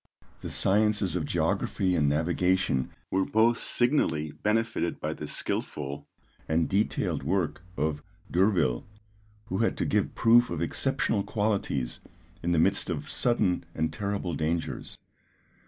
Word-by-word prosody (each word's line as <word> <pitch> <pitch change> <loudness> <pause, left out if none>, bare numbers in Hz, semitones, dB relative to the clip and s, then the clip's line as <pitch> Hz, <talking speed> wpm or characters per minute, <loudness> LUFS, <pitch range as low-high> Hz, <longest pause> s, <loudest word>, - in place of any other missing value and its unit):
The - - -5
sciences 105 -2 +2
of - - -1
geography 90 -2 0
and 75 -4 +2
navigation 85 -2 +1 0.2
were 95 0 +2
both 115 +4 +3
signally 120 - +2
benefited 110 -2 -1
by - - -2
the - - -7
skilful 70 0 0 0.4
and 80 +1 +1
detailed 100 +3 0
work 85 -5 -1 0.2
of 75 0 -1 0.3
D'Urville, 85 - +2 0.6
who 95 -4 -3
had 115 - +1
to - - -1
give 105 -1 0
proof 120 +1 +5
of 85 - -3
exceptional 85 +4 0
qualities 100 - -1 0.4
in 85 - -1
the 85 - +2
midst 80 - +2
of - - -3
sudden 110 -7 +1
and 80 0 -1
terrible 100 -4 -3
dangers. 80 +2 -3
90 Hz, 130 wpm, -28 LUFS, 80-105 Hz, 0.6 s, proof